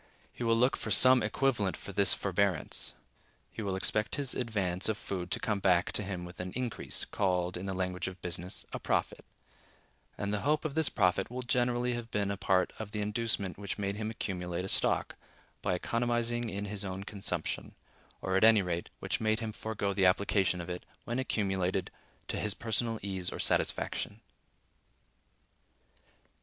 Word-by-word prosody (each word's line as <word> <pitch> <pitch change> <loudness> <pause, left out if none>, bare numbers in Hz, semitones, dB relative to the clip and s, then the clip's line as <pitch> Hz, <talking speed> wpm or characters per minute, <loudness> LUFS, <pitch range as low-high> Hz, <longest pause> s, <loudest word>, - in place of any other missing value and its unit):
He - - -5
will 115 -1 +4
look 125 +3 +4
for - - -5
some 130 -1 +7
equivalent 105 -2 +1
for 100 - -8
this 100 -1 +6
forbearance:(103) 95 -3 +1 0.6
he - - -6
will 100 -3 -1
expect 105 +3 0
his 140 -3 0
advance 100 -6 -1
of 110 - 0
food 90 -4 -4
to - - 0
come 105 -2 0
back 90 -2 +3
to - - +1
him 95 -3 -4
with 90 0 -11
an 90 0 -4
increase, 125 -2 -1
called, 90 -3 0
in 90 +2 -5
the 95 - -2
language 90 -1 -2
of 95 0 -6
business, 90 0 -4
a - - -2
profit; - - -1 0.9
and 100 0 -2
the 105 - +1
hope 150 +6 +1
of 150 - -1
this 160 -2 +3
profit 95 -2 +2
will 125 +1 -4
generally 125 0 +1
have 120 -1 -4
been 100 -2 0
a - - -1
part 95 -1 +2
of 110 -2 -5
the 105 - -2
inducement 105 -3 -1
which 100 -1 -4
made 100 -1 -1
him 110 +1 -3
accumulate 90 -4 -3
a - - -3
stock, - - +2 0.5
by 95 -2 +1
economizing 120 +3 0
in 100 0 -3
his 105 0 -3
own 95 0 -4
consumption; 100 -5 -2 0.5
or, 95 - 0
at 95 - +3
any 110 -2 +7
rate, 85 -1 -2
which - - -1
made 110 0 +2
him 110 -1 -3
forego 105 -2 -2
the 95 -1 +4
application 95 -1 +2
of 85 - -5
it, 90 0 -5 0.2
when 120 +2 -2
accumulated, 95 -6 0 0.4
to - - -2
his 105 -1 0
personal 115 0 -1
ease 95 -3 -2
or - - -5
satisfaction. - - 0
100 Hz, 180 wpm, -31 LUFS, 95-115 Hz, 0.9 s, some